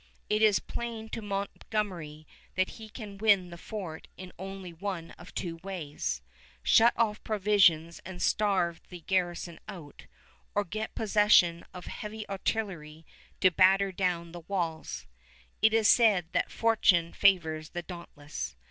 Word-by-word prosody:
It 210 0 +2
is 215 -2 +6
plain 230 -2 -5
to 225 - -5
Montgomery 195 -6 -4 0.3
that 185 0 +1
he 220 -1 -10
can 210 -3 -9
win 200 -5 +4
the - - -7
fort 180 -7 -7
in 185 0 -9
only 190 -2 -7
one 170 -1 -5
of 175 - -14
two 170 -2 -3
ways, 155 - -4 0.4
shut 235 +1 +6
off 220 -2 +1
provisions 190 -6 +3
and 185 -1 -8
starve 185 -6 +1
the 180 -2 -9
garrison 175 -1 -1
out, 155 -6 -10 0.5
or 205 - +2
get 215 +4 -5
possession 205 -5 +4
of 180 -1 -9
heavy 215 0 -6
artillery 180 -6 -3 0.4
to 185 - +6
batter 190 +2 +4
down 175 -2 -1
the 175 - -8
walls. 170 -5 -3 0.6
It 220 - +6
is 220 -1 +4
said 205 -9 +5
that - - 0
fortune 190 -7 +3
favors 160 -6 +2
the 175 -1 -5
dauntless. 155 - -7
190 Hz, 140 wpm, -29 LUFS, 170-210 Hz, 0.6 s, is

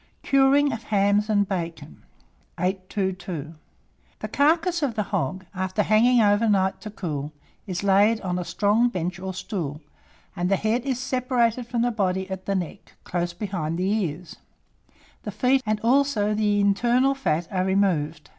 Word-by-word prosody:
CURING 275 +1 +4
OF 230 - -5
HAMS 205 +1 +2
AND 205 -2 +2
BACON. 170 - -5 0.6
822. 185 -3 -3 0.6
The - - -5
carcass 330 +4 +2
of 265 -6 -1
the 210 - 0
hog, 185 +2 -3
after 185 +2 -1
hanging 230 +4 +4
over 210 +2 +3
night 190 -2 +1
to 215 - -7
cool, 155 -8 -5 0.4
is 185 0 -3
laid 200 +3 +4
on 180 -1 -2
a - - -2
strong 210 +6 +2
bench 180 -3 -3
or 190 0 -4
stool, 175 -6 -4 0.6
and 175 +1 -1
the 195 - +4
head 230 +6 -1
is 260 -3 0
separated 250 -3 0
from 240 -1 -1
the 245 - +1
body 190 -3 -1
at 190 0 -6
the 200 - 0
neck, 180 -4 -5
close 175 -1 -2
behind 175 -4 -3
the 185 +2 0
ears; 170 0 -6 0.8
the - - -6
feet 250 +6 +2
and 215 0 +1
also 235 -4 +2
the 210 -1 +1
internal 240 +7 +3
fat 170 - -1
are 185 -1 0
removed. 165 -6 0
200 Hz, 160 wpm, -24 LUFS, 180-235 Hz, 0.8 s, CURING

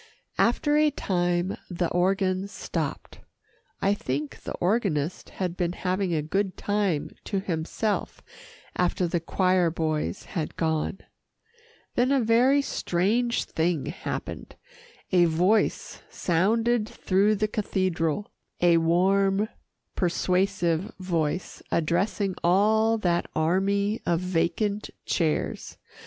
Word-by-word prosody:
After 295 +5 +3
a 305 0 +5
time, 175 -7 -1
the 175 -1 -1
organ 185 +1 +1
stopped. 200 - -5 0.6
I 200 - +4
think 145 -6 -4
the - - -5
organist 180 -6 0
had 180 -2 -2
been 175 -2 -1
having 185 0 -1
a 155 -3 0
good 190 +4 -1
time 200 -7 0
to 200 - -1
himself 190 +4 -2 0.5
after 180 0 +1
the 170 +1 0
choir 180 +1 +2
boys 160 +1 -2
had 165 -6 -3
gone. 160 +3 -1 0.9
Then 250 +2 +2
a 275 - +4
very 250 +5 +4
strange 230 +5 0
thing 160 -2 -1
happened. - - -5 0.6
A 180 -2 +5
voice 180 +7 +1
sounded 220 +6 +1
through 200 +3 +2
the 215 +1 0
cathedral 185 -4 -1 0.3
a 175 -1 +5
warm, 195 +5 +2 0.5
persuasive 180 0 +1
voice, 175 -2 -2
addressing 190 +4 +1
all 215 +5 +4
that 175 -5 0
army 200 +6 +1
of 170 -1 +2
vacant 185 +4 -1 0.2
chairs. 160 -4 -1
185 Hz, 110 wpm, -26 LUFS, 170-205 Hz, 0.9 s, a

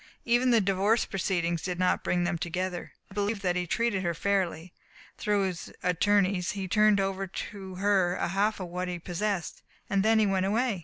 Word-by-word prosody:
Even 240 +2 +3
the 235 -2 +5
divorce 200 +3 +2
proceedings 175 -4 -1
did 180 -2 -3
not 180 0 +1
bring 175 0 +1
them 175 - 0
together. 175 +1 -3 0.2
I - - -11
believe 205 0 -1
that 180 -1 +1
he 180 -1 -1
treated 230 -1 0
her 170 -2 -1
fairly. 180 -2 -1 0.5
Through 205 -1 +1
his 185 -3 -4
attorneys 185 0 +2
he 195 -2 -4
turned 210 +1 +4
over 195 0 -1
to 190 0 -7
her 190 -2 +2
a - - -1
half 205 +4 +1
of 185 -2 -5
what 180 +1 -3
he 180 -1 -3
possessed. 180 +1 -3 0.3
Then 210 +3 +3
he 215 - +4
went 190 -1 +1
away. 225 -1 +1
190 Hz, 190 wpm, -28 LUFS, 180-205 Hz, 0.5 s, the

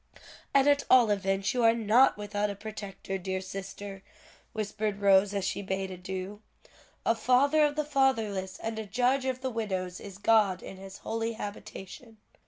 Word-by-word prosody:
"And 275 0 +4
at 285 -1 +4
all 245 -4 +6
events 195 -1 0
you 250 - 0
are 225 0 +6
not 235 +3 +4
without 205 0 -2
a 200 - -4
protector, 200 -2 -6
dear 190 +1 -3
sister," 195 +1 -7 0.5
whispered 215 -1 -3
Rose, 200 0 +5
as 195 -2 -1
she 200 - -2
bade 190 -1 -3
adieu. 185 +3 -6 0.6
"'A - - +4
father 275 +6 +3
of 295 -1 +2
the 305 -1 -1
fatherless, 225 -10 0
and 225 0 -3
a 220 - -4
judge 250 +5 +1
of 260 -1 -2
the 260 -1 -2
widows 190 -5 -3
is 200 -2 -10
God 205 -3 +3
in 190 - -9
his 195 0 -10
holy 225 +1 -3
habitation.'" 215 +1 -8
210 Hz, 170 wpm, -29 LUFS, 195-235 Hz, 0.6 s, all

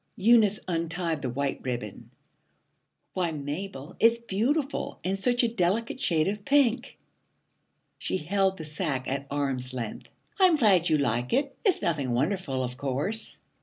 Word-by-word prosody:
Eunice 210 0 +5
untied 165 -2 -2
the 130 - -2
white 140 +3 -2
ribbon. 120 -5 -5 1.0
'Why, 180 -3 0
Mabel, 150 +1 -6
it's 230 +1 +5
beautiful, 240 +7 -1
and 190 +2 0
such 245 +5 +2
a - - +4
delicate 225 +3 0
shade 165 - +2
of 205 +1 -3
pink!' 275 -2 +2 1.0
She - - -1
held 190 +3 +1
the 160 - -7
sack 150 -4 -3
at 140 +1 -3
arm's 135 -3 -2
length. 115 -4 -5 0.3
'I'm 370 -3 +6
glad 195 - +4
you 155 - +4
like 120 -3 0
it. 275 +2 +1
It's 390 -6 +2
nothing 140 -7 0
wonderful, 140 -1 0
of 125 0 -5
course.' 140 +12 -2
175 Hz, 145 wpm, -27 LUFS, 140-220 Hz, 1.0 s, I'm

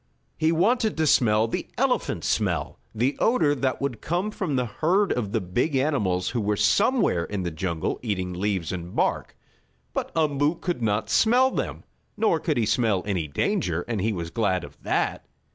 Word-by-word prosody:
He 160 0 +2
wanted 215 +6 +2
to 160 - +2
smell 110 -6 +4
the - - -3
elephant - - 0
smell - - -1
the 120 +6 0
odor 190 -12 +3
that 135 -2 -1
would 135 -5 -3
come 180 +6 -1
from 185 -9 -2
the 125 -1 +1
herd 175 - +1
of 105 -5 -3
the 115 - +1
big 115 - -1
animals 105 -11 +1
who 120 - -1
were 105 0 0
somewhere 155 - +3
in 100 -2 -4
the 85 - -2
jungle 80 0 -2
eating 95 -6 -2
leaves 95 -2 -1
and 90 -1 -6
bark. - - -1 0.6
But - - -3
Umboo 150 0 +2
could 175 -6 -3
not 105 -1 0
smell 250 +4 +4
them. - - -3 0.3
Nor 210 -7 +2
could 155 -3 -1
he 115 - +2
smell 110 -3 +1
any 90 -6 -1
danger, 90 - -1
and 115 -5 -2
he 110 +3 +1
was 85 -4 -4
glad 95 -6 0
of - - -12
that. - - -1
120 Hz, 180 wpm, -25 LUFS, 95-160 Hz, 0.6 s, smell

